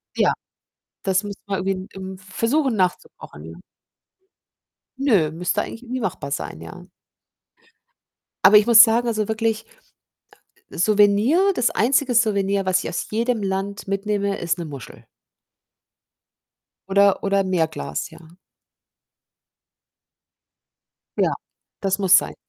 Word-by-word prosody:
Ja, -, -, +2 dB, 0.7 s
das 190 Hz, 0 st, +1 dB
müssten 200 Hz, -1 st, -8 dB
wir 195 Hz, -1 st, -2 dB
irgendwie 195 Hz, +1 st, -1 dB
in 185 Hz, 0 st, -7 dB
im 190 Hz, -1 st, -8 dB
versuchen 230 Hz, +7 st, -1 dB
nach 185 Hz, -2 st, +2 dB
zu -, -, -20 dB
kochen, 75 Hz, +2 st, -12 dB
ja. 80 Hz, +1 st, -10 dB, 1.4 s
Nö, 200 Hz, -, +2 dB
müsste 180 Hz, +5 st, -1 dB
eigentlich 230 Hz, -, -8 dB
irgendwie 255 Hz, +1 st, -5 dB
machbar 155 Hz, -7 st, -4 dB
sein, -, -, -5 dB
ja. -, -, -11 dB, 1.6 s
Aber 210 Hz, +2 st, +8 dB
ich 210 Hz, -, +4 dB
muss 235 Hz, 0 st, +9 dB
sagen, 235 Hz, +1 st, +2 dB
also, 215 Hz, -2 st, -1 dB
wirklich 220 Hz, 0 st, -1 dB, 1.1 s
ah, -, -, -14 dB
äh, -, -, -8 dB
Souvenir 215 Hz, -, +3 dB
das 245 Hz, -, +1 dB
einzige 255 Hz, +2 st, +1 dB
Souvenir, 200 Hz, -4 st, +1 dB
was 185 Hz, 0 st, +1 dB
ich -, -, -4 dB
aus -, -, -4 dB
jedem 230 Hz, 0 st, -1 dB
Land 195 Hz, +1 st, -4 dB
mitnehme, 200 Hz, 0 st, -2 dB
ist 170 Hz, +1 st, -2 dB
'ne 170 Hz, -, -4 dB
Muschel 140 Hz, -6 st, -10 dB, 1.9 s
oder 200 Hz, 0 st, +4 dB
oder 200 Hz, 0 st, +1 dB
'n 190 Hz, -, -4 dB
Meerglas, 115 Hz, -, -2 dB
ja. 170 Hz, +1 st, -17 dB, 2.8 s
Ja, -, -, +2 dB, 0.5 s
das 195 Hz, 0 st, 0 dB
muss 190 Hz, -2 st, +6 dB
sein. -, -, -2 dB
200 Hz, 130 wpm, -22 LUFS, 185-225 Hz, 2.8 s, muss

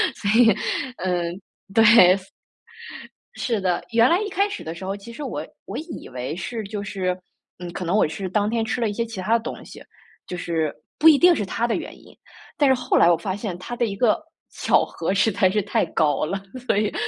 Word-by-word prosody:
所 200 Hz, -, -3 dB
以 225 Hz, -4 st, +6 dB, 0.4 s
嗯， 175 Hz, -2 st, -1 dB, 0.4 s
对。 225 Hz, -, +5 dB, 1.5 s
是 225 Hz, -5 st, -1 dB
的， 180 Hz, -2 st, 0 dB
原 230 Hz, +1 st, +5 dB
来 345 Hz, +3 st, +3 dB
一 425 Hz, -, -2 dB
开 400 Hz, +1 st, 0 dB
始 405 Hz, -, -6 dB
的 160 Hz, +1 st, -6 dB
时 180 Hz, -, -9 dB
候， 195 Hz, +1 st, -3 dB
其 220 Hz, +4 st, -11 dB
实 295 Hz, -, -7 dB
我 -, -, -4 dB, 0.2 s
我 -, -, -6 dB
以 320 Hz, -, -8 dB
为 130 Hz, +4 st, -5 dB
是 225 Hz, +5 st, -4 dB
就 205 Hz, 0 st, -5 dB
是 185 Hz, -2 st, -2 dB, 0.4 s
嗯， 175 Hz, -1 st, -7 dB
可 180 Hz, -, -5 dB
能 180 Hz, +5 st, 0 dB
我 -, -, +4 dB
是 175 Hz, +5 st, -4 dB
当 205 Hz, +3 st, 0 dB
天 230 Hz, 0 st, 0 dB
吃 235 Hz, +2 st, -2 dB
了 225 Hz, -, +1 dB
一 205 Hz, -, -3 dB
些 230 Hz, +2 st, -1 dB
其 225 Hz, -5 st, -7 dB
它 225 Hz, +5 st, +2 dB
的 -, -, -5 dB
东 -, -, -7 dB
西， -, -, -12 dB, 0.5 s
就 180 Hz, -, -5 dB
是 165 Hz, -4 st, -2 dB, 0.3 s
不 320 Hz, -, +6 dB
一 310 Hz, -, +8 dB
定 350 Hz, +3 st, +6 dB
是 210 Hz, -10 st, -1 dB
它 225 Hz, +5 st, -1 dB
的 235 Hz, -, 0 dB
原 -, -, -8 dB
因。 -, -, -18 dB, 0.4 s
但 285 Hz, -2 st, +4 dB
是 -, -, +6 dB
后 250 Hz, -1 st, 0 dB
来 170 Hz, -, +6 dB
我 175 Hz, -, +5 dB
发 185 Hz, +3 st, -4 dB
现， 200 Hz, -3 st, -5 dB
它 210 Hz, +6 st, -8 dB
的 240 Hz, 0 st, 0 dB
一 200 Hz, -2 st, -4 dB
个 240 Hz, +6 st, +2 dB, 0.3 s
巧 -, -, +2 dB
合 170 Hz, +3 st, -3 dB
实 200 Hz, +3 st, +3 dB
在 190 Hz, 0 st, +3 dB
是 210 Hz, +2 st, +1 dB
太 210 Hz, +3 st, 0 dB
高 150 Hz, -1 st, +1 dB
了， 195 Hz, +5 st, -3 dB, 0.3 s
所 -, -, +2 dB
以 210 Hz, 0 st, 0 dB
205 Hz, 245 characters per minute, -23 LUFS, 180-235 Hz, 1.5 s, 一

